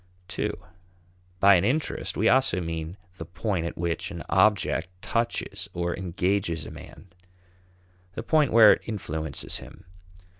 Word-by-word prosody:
(ii) - - +1 0.9
By 100 +1 +7
an 85 - 0
interest 140 +9 -1
we 110 - +2
also 130 -8 +3
mean 80 +1 -5 0.2
the 80 - -7
point 90 -1 -2
at - - -7
which 85 -1 -2
an - - -7
object 105 -4 +2 0.2
touches 115 0 -2
or 85 0 -1
engages 90 -2 -1
a - - -8
man; 95 - -13 1.0
the 115 - -5
point 150 +1 +2
where 110 -2 +8
it - - -4
influences 80 - -4
him. - - -13
95 Hz, 140 wpm, -26 LUFS, 85-110 Hz, 1.0 s, where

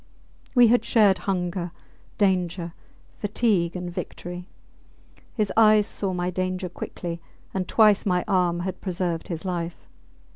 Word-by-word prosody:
We 245 -1 +8
had 240 -1 +4
shared 205 -5 +4
hunger, 180 -1 -1 0.5
danger, 180 -3 +1 0.5
fatigue, 205 -5 +1
and 180 -1 -5
victory. 175 +1 -6 0.9
His 215 -4 0
eyes 215 -2 +6
saw 195 -2 -3
my 180 0 -1
danger 185 0 -2
quickly, 170 0 -6 0.3
and 190 -1 -2
twice 215 -3 +5
my 180 -2 +1
arm 180 -3 +2
had 185 0 -4
preserved 175 -3 -2
his 170 +1 -5
life. 175 -2 -4
185 Hz, 125 wpm, -25 LUFS, 175-200 Hz, 0.9 s, We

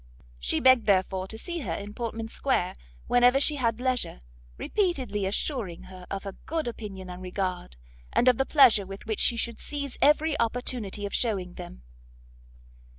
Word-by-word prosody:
She 65 - 0
begged 260 -3 +5
therefore 190 -1 +2
to 220 - -7
see 345 +8 -4
her 290 - -3
in 205 +1 -6
Portman 225 -1 -4
square 230 -5 0 0.3
whenever 245 +2 +5
she 295 +1 +2
had 230 -3 0
leisure, 255 - 0 0.4
repeatedly 260 - 0
assuring 200 - -2
her 185 -1 -12
of 195 -1 -4
her 200 - -5 0.2
good 320 -4 -1
opinion 200 -5 -6
and 180 0 -8
regard, 180 - -4 0.3
and 245 - +2
of 250 -1 +5
the - - +4
pleasure 245 -9 +6
with 195 +1 -9
which 220 -1 -2
she 235 - +3
should 235 0 -3
seize 285 -3 -5
every 300 +1 +4
opportunity 230 -3 -1
of 200 - -5
shewing 195 -7 -1
them. - - -10
225 Hz, 165 wpm, -27 LUFS, 190-260 Hz, 0.4 s, pleasure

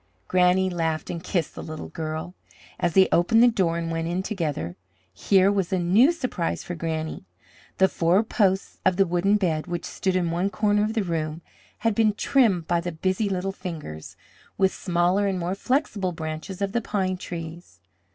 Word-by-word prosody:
Granny 185 +1 +3
laughed 165 -4 -2
and 170 0 -6
kissed 170 -5 -1
the - - -7
little 155 -1 -7
girl, 160 +2 -5 0.5
as 175 -1 0
they 190 -1 +7
opened 225 +7 +4
the - - +8
door 185 -8 +1
and 165 -1 -3
went 165 0 -2
in 180 +2 -1
together. 150 - -3 0.4
Here 190 - +3
was 195 -4 -1
a 190 - +2
new 195 - +5
surprise 255 - -3
for 175 - -5
Granny. 160 -2 -4 0.5
The 190 - +5
four 175 +4 +2
posts 195 -4 0
of 185 - +3
the 195 - +5
wooden 180 +3 +2
bed, 165 -5 -1
which 175 -1 -4
stood 190 -2 -2
in 175 -2 +1
one 180 +4 0
corner 205 +2 +1
of 215 +2 -2
the 220 - +1
room, 165 -2 -3 0.4
had 225 - +4
been 215 0 +3
trimmed 205 - +2
by 170 -1 +1
the 175 0 -4
busy 185 +5 -1
little 190 0 -1
fingers, 160 - -8 0.4
with 190 -1 +3
smaller 180 +2 +1
and 190 -1 -1
more 175 +1 -2
flexible 205 - -1
branches 160 +5 -5
of 195 - -1
the 235 +2 0
pine 190 -4 -1
trees. 170 -1 -8
180 Hz, 185 wpm, -25 LUFS, 165-195 Hz, 0.5 s, the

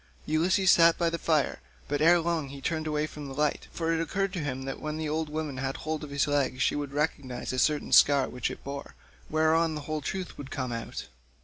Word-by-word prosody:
Ulysses 180 +5 +3
sat 165 -1 +6
by 170 -1 +1
the 170 - -2
fire, 150 - +1 0.3
but 145 +1 -1
ere 170 +2 +6
long 165 -3 -1
he 140 0 -8
turned 155 +2 -2
away 150 0 0
from 150 -2 -8
the 135 - -7
light, 150 +1 0
for 165 -1 -1
it 165 - 0
occurred 195 +3 -1
to 185 - -2
him 135 -3 -3
that 135 - -5
when 155 0 -3
the 160 -1 -2
old 155 +1 -1
woman 150 -3 -3
had 135 +1 -2
hold 155 0 -3
of 150 - -6
his 140 0 +1
leg 140 -3 0
she 120 - +2
would 145 -2 -3
recognise 140 -4 -2
a 130 - 0
certain 150 +3 +1
scar 140 -2 +6
which 125 - -3
it - - -8
bore, 140 0 -7 0.3
whereon 160 +1 +2
the 150 - -4
whole 155 +1 -3
truth 185 +6 -5
would 140 -2 -7
come 130 -2 -3
out. 115 -1 -5
150 Hz, 235 wpm, -28 LUFS, 140-160 Hz, 0.3 s, sat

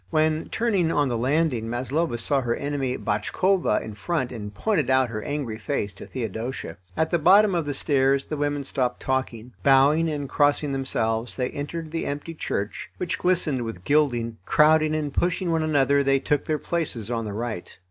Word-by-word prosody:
When 155 - +1
turning, 200 -8 +1
on 145 -3 +2
the 120 - -1
landing, 130 -2 +1
Maslova 130 +4 -1
saw 135 +4 +1
her 120 -2 0
enemy, 140 -3 -2
Botchkova, 175 - +1
in 110 -1 -7
front, 130 +4 -2
and 105 -4 -6
pointed 185 - 0
out 130 -1 +3
her 110 -1 -4
angry 140 -7 -4
face 105 -5 -2
to 100 - -11
Theodosia. 115 -5 -5 0.2
At 160 0 +1
the 170 - +2
bottom 195 +5 +6
of 165 -4 -1
the 145 - -2
stairs 135 -1 +2
the 155 - -4
women 145 -1 -1
stopped 130 -2 -1
talking. 125 -3 -3
Bowing 140 +4 +4
and 145 -2 -3
crossing 145 +1 +2
themselves, 115 -4 -1
they 125 -1 -2
entered 155 +2 -5
the 165 - -2
empty 145 +4 -4
church, 100 -9 -4
which 180 - -2
glistened 170 -7 +1
with 115 -7 -6
gilding. 120 -6 +1
Crowding 155 +5 +4
and 150 -3 -2
pushing 175 +1 0
one 165 -1 +1
another, 140 -2 +3
they 135 0 +3
took 145 +1 0
their 155 - 0
places 145 -11 -3
on 115 -1 -1
the 105 - -5
right. 110 -4 -5
140 Hz, 185 wpm, -25 LUFS, 120-155 Hz, 0.2 s, bottom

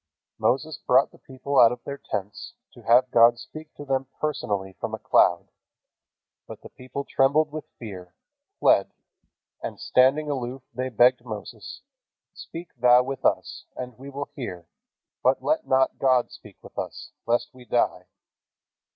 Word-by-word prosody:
Moses 155 +5 0
brought 130 +2 +3
the - - -19
people 135 +1 -2
out 115 -1 +8
of 125 0 -7
their 140 0 -6
tents 100 +1 -6 0.2
to - - -15
have 125 +2 +4
God 120 0 +6
speak 155 +6 -11
to 145 - -9
them 135 -1 -1
personally 105 -11 -2
from - - -3
a - - -10
cloud. 85 -1 +3 1.0
But - - -10
the - - -10
people 130 +2 -7
trembled 145 +3 +2
with 155 -1 -7
fear, 95 -6 -9 0.4
fled, - - +4 0.7
and - - -6
standing 135 +4 +3
aloof 130 -2 -4
they 130 +2 -3
begged 125 +1 +4
Moses: 110 -4 -8 0.5
"Speak 170 +1 -10
thou 125 +1 +6
with 135 0 -6
us, - - 0
and 125 -2 -7
we 135 +1 -9
will 140 +1 -6
hear: 90 - -7 0.5
but 130 +1 +2
let 310 +1 0
not 130 0 +2
God 130 -2 +2
speak - - -14
with - - -9
us, - - -6 0.2
lest 120 +5 0
we 125 -1 -14
die." 90 -7 0
130 Hz, 155 wpm, -25 LUFS, 120-140 Hz, 1.0 s, out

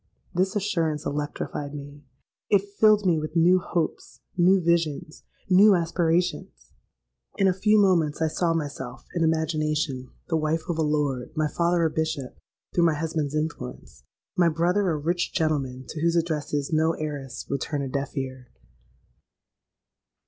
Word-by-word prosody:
'—This 185 +3 0
assurance 165 -7 -1
electrified 145 0 -4
me: 145 0 -9 0.5
it 200 -2 +4 0.2
filled 215 -2 +5
me 170 -4 +3
with 155 +1 -6
new 175 +3 +5
hopes, 170 -2 -3
new 185 +2 +5
visions, 165 -3 0 0.3
new 195 +2 +7
aspirations. 170 +1 -1 0.6
In 195 - +3
a 185 - +3
few 210 +3 +3
moments 170 -7 +3
I 160 - +2
saw 165 +1 0
myself 140 -5 -5
(in 170 - 0
imagination) 155 -4 0 0.2
the 165 - +1
wife 155 +1 0
of 165 -2 -1
a - - +3
Lord, 145 -5 0
my 155 -1 +1
father 170 +3 +1
a 160 - +3
Bishop, 160 -5 -3 0.4
through 175 - +3
my 165 -2 +3
husband's 155 -2 -2
influence, 150 - -5 0.3
and - - +1
my 170 - +5
brother 180 +5 +1
a 160 - 0
rich 170 +4 -1
gentleman 135 -5 -1
to 155 - -5
whose 170 +1 +2
addresses 150 -3 -1
no 160 +1 +3
heiress 145 -5 -5
would 140 - -2
turn 145 -2 -2
a - - -3
deaf 140 +2 -4
ear! 130 -2 -5
160 Hz, 155 wpm, -25 LUFS, 145-175 Hz, 0.6 s, new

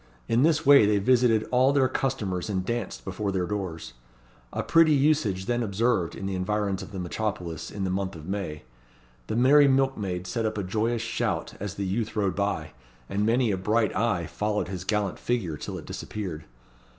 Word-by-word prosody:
In 115 +2 +2
this 155 +1 +3
way 140 -6 +8
they 105 0 +3
visited 115 0 +3
all 130 +2 +4
their 140 -2 +3
customers 110 -9 -2
and 95 -2 -1
danced 120 +1 -4
before 100 +1 -2
their 95 -2 0
doors. 90 -9 -4 0.6
A - - -2
pretty 165 -2 +5
usage 135 -10 +2
then 120 +2 0
observed 105 -4 0
in 95 - -6
the 95 - -2
environs 100 +1 -1
of - - -9
the 100 - -7
metropolis 90 -3 -3
in 100 - -5
the 95 - -1
month 95 0 -2
of 80 -2 -10
May. 95 -5 -4 0.6
The 110 - -2
merry 140 +4 +6
milkmaids 110 -10 0
set 115 +5 -2
up 110 - -4
a 100 - -1
joyous 110 +5 -1
shout 115 - -2
as 100 -1 -5
the 100 - -3
youth 110 +4 -2
rode 100 -4 0
by; 90 -7 -1 0.4
and 105 +2 0
many 120 0 +2
a 95 - 0
bright 105 +4 +1
eye 105 -7 +1
followed 105 +4 -2
his 95 -1 -5
gallant 105 -2 -1
figure 110 -11 -1
till - - -6
it - - -9
disappeared. 90 -8 -6
105 Hz, 190 wpm, -26 LUFS, 95-120 Hz, 0.6 s, way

